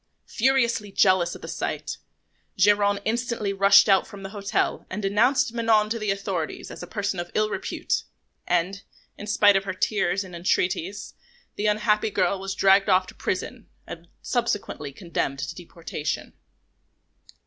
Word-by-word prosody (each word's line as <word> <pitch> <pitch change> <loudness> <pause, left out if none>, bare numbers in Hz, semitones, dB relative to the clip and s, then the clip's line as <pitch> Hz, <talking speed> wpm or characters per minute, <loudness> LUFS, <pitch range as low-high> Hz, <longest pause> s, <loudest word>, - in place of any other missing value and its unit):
Furiously 235 -4 +1
jealous 185 -3 +3
at - - -12
the - - -6
sight, - - -4 0.6
Geronte 205 +1 +3
instantly 230 -3 -1
rushed 200 +2 +6
out 195 -2 +4
from 200 -3 -11
the 195 - -6
hotel 200 -1 -1
and 190 - -4
denounced 235 +6 +2
Manon 220 -2 +2
to 230 - -1
the 215 -1 -2
authorities 195 -5 -3
as - - -9
a 175 - -7
person 200 -1 -3
of 175 0 -4
ill 215 0 +1
repute; - - -2 0.5
and, 180 +3 0 0.3
in 205 - -9
spite 205 -1 +5
of 195 0 +1
her 190 -1 -4
tears 195 -1 0
and 185 -2 -10
entreaties, 180 +2 -1 0.4
the 210 - -1
unhappy 210 0 +2
girl 195 -1 0
was 195 0 -4
dragged 195 +1 +4
off 185 0 +4
to - - -12
prison 225 +5 -4 0.2
and 170 0 -10 0.2
subsequently 205 - -2
condemned 145 -3 -3
to 145 +1 -4
deportation. 165 -3 -5
200 Hz, 155 wpm, -25 LUFS, 185-215 Hz, 0.6 s, rushed